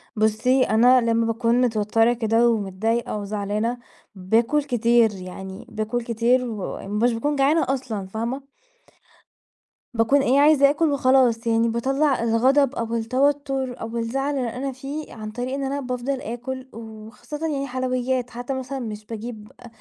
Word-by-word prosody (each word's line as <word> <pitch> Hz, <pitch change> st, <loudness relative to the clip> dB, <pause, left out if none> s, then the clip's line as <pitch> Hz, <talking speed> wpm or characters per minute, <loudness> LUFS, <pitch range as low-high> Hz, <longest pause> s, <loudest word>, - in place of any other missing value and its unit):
بُصّي، 220 Hz, +5 st, +2 dB
أنا 245 Hz, +3 st, +5 dB
لمّا 230 Hz, 0 st, +1 dB
باكون 230 Hz, +2 st, +1 dB
متوترة 225 Hz, 0 st, +2 dB
كده، 230 Hz, 0 st, +2 dB
ومتضايقة 220 Hz, +2 st, -1 dB
وزعلانة، 210 Hz, +3 st, -2 dB, 0.4 s
باكل 225 Hz, +10 st, +1 dB
كتير، 235 Hz, -3 st, +3 dB
يعني 190 Hz, +4 st, -8 dB
باكل 220 Hz, +2 st, -2 dB
كتير 240 Hz, +2 st, +1 dB
ومش 215 Hz, +1 st, -2 dB
باكون 290 Hz, +6 st, -1 dB
جعانة 285 Hz, +4 st, +3 dB
أصلًا، 240 Hz, -8 st, -3 dB
فاهمة؟ 235 Hz, +7 st, -4 dB, 1.5 s
باكون 235 Hz, +5 st, +3 dB
إيه 270 Hz, +2 st, +3 dB
عايزة 290 Hz, -1 st, +6 dB
آكُل 300 Hz, +1 st, +1 dB
وخلاص 255 Hz, -4 st, +3 dB
يعني 230 Hz, 0 st, +2 dB
باطَلّع 270 Hz, +3 st, +1 dB
الغضب 260 Hz, +4 st, +3 dB
أو 230 Hz, 0 st, -2 dB
التوتر 265 Hz, +2 st, 0 dB
أو 225 Hz, +1 st, -4 dB
الزعل 270 Hz, +5 st, -1 dB
اللي 250 Hz, -3 st, -1 dB
أنا 270 Hz, +1 st, -3 dB
فيه، 275 Hz, +4 st, -7 dB
عن 215 Hz, -2 st, -7 dB
طريق 245 Hz, +4 st, -4 dB
إن 275 Hz, -, -2 dB
أنا 275 Hz, +1 st, -2 dB
بافضل 255 Hz, +1 st, -3 dB
آكل، 255 Hz, +3 st, -6 dB
وخاصةً 225 Hz, +7 st, -7 dB
يعني 275 Hz, -3 st, -2 dB
حلويات، 255 Hz, -1 st, -1 dB
حتى 245 Hz, +3 st, -5 dB
مثلًا 265 Hz, +1 st, -4 dB
مش 215 Hz, -3 st, -6 dB
باجيب 220 Hz, -1 st, -8 dB
أ -, -, -12 dB
240 Hz, 140 wpm, -23 LUFS, 225-270 Hz, 1.5 s, عايزة